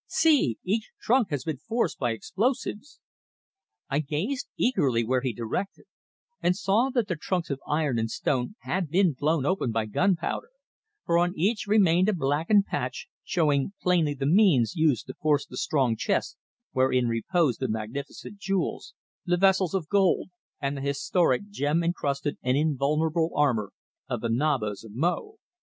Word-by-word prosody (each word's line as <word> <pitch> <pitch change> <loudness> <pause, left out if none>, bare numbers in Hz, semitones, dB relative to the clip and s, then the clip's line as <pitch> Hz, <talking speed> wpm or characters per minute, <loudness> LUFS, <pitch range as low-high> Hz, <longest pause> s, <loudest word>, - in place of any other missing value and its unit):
See! 295 - +3
Each 215 +4 -1
trunk 240 -4 +2
has 145 -5 -2
been 160 -4 -3
forced 230 - -2
by 120 - 0
explosives!" 220 - -2 0.9
I 140 - 0
gazed 165 - -2
eagerly 135 - +2
where 130 +2 +1
he 130 -1 -1
directed, 120 - -4 0.6
and 180 - +2
saw 220 +6 +2
that 240 -5 0
the 180 - -1
trunks 170 +1 -2
of 140 - -3
iron 150 -5 0
and 115 0 -1
stone 125 - -1
had 185 -4 -2
been 180 0 +3
blown 150 +1 0
open 165 -8 0
by 110 -1 0
gunpowder, 180 - 0 0.6
for 170 0 +3
on 175 +1 +1
each 210 +5 0
remained 190 -3 +4
a - - +2
blackened 165 +7 +2
patch, - - -4
showing 150 0 +1
plainly 170 -5 +2
the 135 0 -3
means 165 - +4
used 155 -7 +2
to - - -7
force 150 -2 +1
the - - -11
strong 130 -6 +1
chest - - -1 0.4
wherein 130 -1 +2
reposed 130 - +1
the - - -1
magnificent 120 - -6
jewels, 195 -2 -2 0.3
the 175 0 +2
vessels 190 -1 +3
of 175 -5 -2
gold, 195 -1 +2 0.3
and 140 +1 -2
the - - -5
historic 165 +8 +1
gem 155 -1 0
encrusted 145 -4 -2
and 125 +1 +1
invulnerable 155 +3 +1
armour 120 -9 +1 0.4
of 120 -4 -2
the 115 - -2
Nabas 115 -5 0
of 110 -2 -12
Mo. 180 - -1
155 Hz, 160 wpm, -27 LUFS, 135-190 Hz, 0.9 s, remained